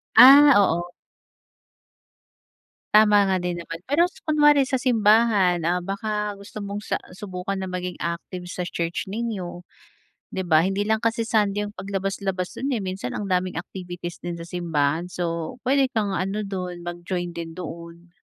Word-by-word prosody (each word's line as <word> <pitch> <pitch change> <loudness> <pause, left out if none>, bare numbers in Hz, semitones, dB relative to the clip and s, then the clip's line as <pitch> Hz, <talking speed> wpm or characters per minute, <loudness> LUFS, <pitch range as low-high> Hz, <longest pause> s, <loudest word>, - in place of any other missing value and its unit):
Ah, 275 +4 +10
oo. 175 -2 +1 2.0
Tama 210 -1 +6
nga 190 -1 +1
din 175 0 -2
naman. 165 -1 -7
Pero 295 +5 +3
s 360 - -3
kunwari 295 -3 +4
sa 265 - 0
simbahan, 215 -7 +3
ah, 175 +2 +1
baka 210 +2 -3
gusto 200 +2 -10
mong 200 +1 -5
sa - - -2 0.2
subukan 195 -1 -5
na 190 -1 -4
maging 180 -1 -4
active 170 +2 -4
sa 180 -1 -4
church 170 +3 -3
ninyo. 195 -5 -4 0.7
'Di 190 - -2
ba, 165 -1 +3
hindi 195 +1 0
lang 220 - +3
kasi 230 +1 0
Sunday 210 -2 +1
'yong 205 -1 -6
paglabas-labas 195 -1 -3
do'n, 270 0 -1
eh, 220 - -1
minsan 185 -9 -4
ang 200 -2 -4
daming 180 -2 0
activities 175 -2 -7
din 175 - -3
sa 170 - -8
simbahan. 165 -2 0
So, 170 +4 -4
puwede 270 +1 +3
kang 205 -4 0
ano 195 +3 -2
do'n, 180 -3 -5
mag-join 175 +1 -4
din 170 -1 -7
doon. 170 0 -9
190 Hz, 160 wpm, -24 LUFS, 175-210 Hz, 2.0 s, Ah